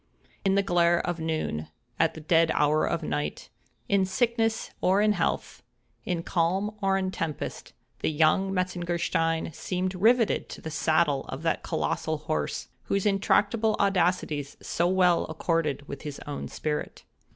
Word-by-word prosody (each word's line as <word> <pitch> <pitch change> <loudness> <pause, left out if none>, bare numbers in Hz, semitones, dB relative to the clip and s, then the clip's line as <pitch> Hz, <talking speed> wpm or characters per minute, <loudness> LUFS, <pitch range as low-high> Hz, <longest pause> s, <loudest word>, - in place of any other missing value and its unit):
In 195 -1 +3
the 200 - +3
glare 175 -2 +3
of 175 -1 -2
noon—at 120 - -2
the 160 - -8
dead 165 +1 +3
hour 150 +1 +3
of 170 -1 -1
night—in 75 - -3
sickness 225 +1 0
or 190 +2 +3
in 210 0 +4
health—in 180 -3 -4
calm 190 +6 0
or 195 0 +2
in 190 -1 -1
tempest—the 160 -2 -5
young 160 +5 +3
Metzengerstein 175 -3 -1
seemed 185 +4 -2
rivetted 225 +5 +3
to - - -8
the 160 - -6
saddle 155 -2 +2
of 135 +4 -7
that 165 - +1
colossal 160 0 -1
horse, 155 +1 -3 0.2
whose 200 0 0
intractable 210 +2 +2
audacities 180 -7 +1
so 170 - 0
well 180 -1 +3
accorded 160 -3 -1
with 140 - -7
his 145 -2 -6
own 145 -1 -5
spirit. 150 -1 -4
170 Hz, 135 wpm, -27 LUFS, 155-195 Hz, 0.2 s, in